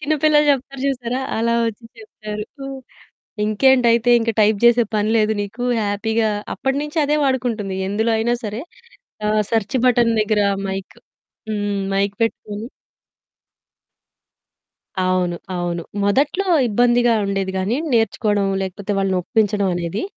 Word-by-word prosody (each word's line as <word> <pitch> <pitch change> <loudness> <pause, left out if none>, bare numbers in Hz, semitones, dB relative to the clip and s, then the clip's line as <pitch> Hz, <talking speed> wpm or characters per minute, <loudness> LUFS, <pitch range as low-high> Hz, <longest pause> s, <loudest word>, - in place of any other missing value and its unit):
చిన్న 305 +1 0
పిల్లలు 300 -1 +5
చెప్తారు 275 0 -5
చూసారా? 250 -2 -2 0.2
అలా 235 +1 +1
వచ్చి 230 +1 -5 0.2
చెప్పారు. 220 - -8 0.8
"ఇంకేంటైతే 235 +1 +3
ఇంక 230 0 0
టైప్ 210 -1 +3
చేసే 240 0 +5
పని 210 +1 +1
లేదు 215 -1 +2
నీకు 225 +5 -5 0.2
హ్యాపీగా" 215 +2 0 0.2
అప్పటినుంచి 290 +4 -2
అదే 295 +1 +1
వాడుకుంటుంది. 230 -7 -1
ఎందులో 220 +3 0
అయినా 235 +2 +1
సరే 215 +4 -4 0.6
ఆహ్, 215 0 +2
సెర్చ్ 225 +2 0
బటన్ 235 -2 +4
దగ్గర 210 -1 +1 0.3
మైక్ 190 0 -6 0.5
హ్మ్ 205 -1 -2 0.2
మైక్ 200 +1 0
పెట్టుకొని 220 0 -3 2.3
అవును, 185 -1 0 0.2
అవును. 175 -1 -2 0.2
మొదట్లో 285 - +1 0.2
ఇబ్బందిగా 240 +2 +3
ఉండేది 195 -1 -2
గాని 200 +6 0 0.2
నేర్చుకోవడం 210 -3 +1 0.2
లేకపోతే 195 +2 -4
వాళ్ళని 195 -1 +1
ఒప్పించడం 205 0 +1
అనేది. 175 +2 -3
220 Hz, 120 wpm, -20 LUFS, 200-245 Hz, 2.3 s, పిల్లలు